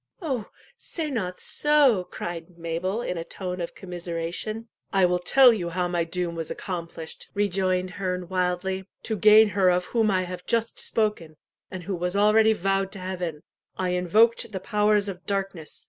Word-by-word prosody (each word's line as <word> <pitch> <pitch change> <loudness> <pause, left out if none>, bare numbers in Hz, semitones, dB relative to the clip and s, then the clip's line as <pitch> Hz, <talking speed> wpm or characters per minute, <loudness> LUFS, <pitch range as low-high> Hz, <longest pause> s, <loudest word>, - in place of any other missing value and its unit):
"Oh, 265 - -3 0.3
say 315 -3 -4
not 185 -8 -2
so!" 285 -10 +3
cried 170 0 -6
Mabel, 170 +7 -2
in 180 -6 -3
a - - -3
tone 180 +1 -5
of 170 - -5
commiseration. 180 +5 -5 0.2
"I 195 -2 +4
will 180 0 +2
tell 250 +7 +6
you 175 -6 -3
how 180 +1 -1
my 175 -1 0
doom 175 0 -2
was 165 -1 -4
accomplished," 170 -3 -6
rejoined 185 -2 0
Herne 180 -2 -3
wildly. 185 +1 -1 0.2
"To 220 - -2
gain 215 +2 +7
her 190 -1 +3
of 180 0 +2
whom 225 0 +1
I 185 -2 +2
have 180 0 -7
just 230 -1 0
spoken, 210 -8 -1 0.3
and 185 -2 -7
who 195 +3 -3
was 180 +2 -2
already 215 +2 +5
vowed 195 -1 0
to 195 - -4
Heaven, 180 -4 -4 0.3
I 185 -1 -1
invoked 210 +6 +3
the 190 - -4
powers 210 +1 +2
of 185 -2 -6
darkness. 195 -6 -3
185 Hz, 170 wpm, -25 LUFS, 180-210 Hz, 0.3 s, gain